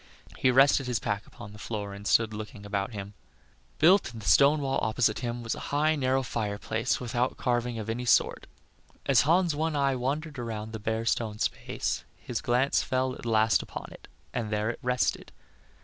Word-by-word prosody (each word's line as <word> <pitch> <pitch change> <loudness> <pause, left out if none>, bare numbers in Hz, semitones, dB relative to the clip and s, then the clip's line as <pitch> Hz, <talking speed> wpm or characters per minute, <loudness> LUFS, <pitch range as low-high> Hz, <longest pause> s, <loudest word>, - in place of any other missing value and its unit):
He 130 - +2
rested 135 +1 +5
his 125 -2 0
pack 100 0 -3
upon 105 0 -11
the 105 - -12
floor 105 -3 -4
and 100 +1 -7
stood 115 -1 +3
looking 105 0 -8
about 100 +1 -2
him. 100 0 -6 0.6
Built 180 - +5
in 115 - -8
the 105 - -10
stone 140 +11 +5
wall 135 -1 0
opposite 110 0 +1
to - - -6
him, 120 -1 -3
was 115 - -2
a - - -7
high, 155 +2 +2
narrow 135 -2 +1
fireplace 110 +1 -2
without 125 +1 -1
carving 120 -1 -1
of 110 -1 -5
any 120 +2 -3
sort. 120 - +2 0.6
As 135 -3 +5
Hans' 170 +2 +3
one 160 +1 -1
eye 140 -2 +2
wandered 145 +3 -3
around 110 -2 -5
the 110 - -4
bare 110 +2 -2
stone 110 -2 0
space, - - -2
his 120 - -4
glance 125 +3 +2
fell 130 -1 0
at 120 - -8
last 110 0 +3
upon - - -8
it, - - -13 0.3
and 115 -3 -2
there 105 +1 0
it - - -10
rested. 125 -1 0
120 Hz, 195 wpm, -28 LUFS, 110-135 Hz, 0.6 s, rested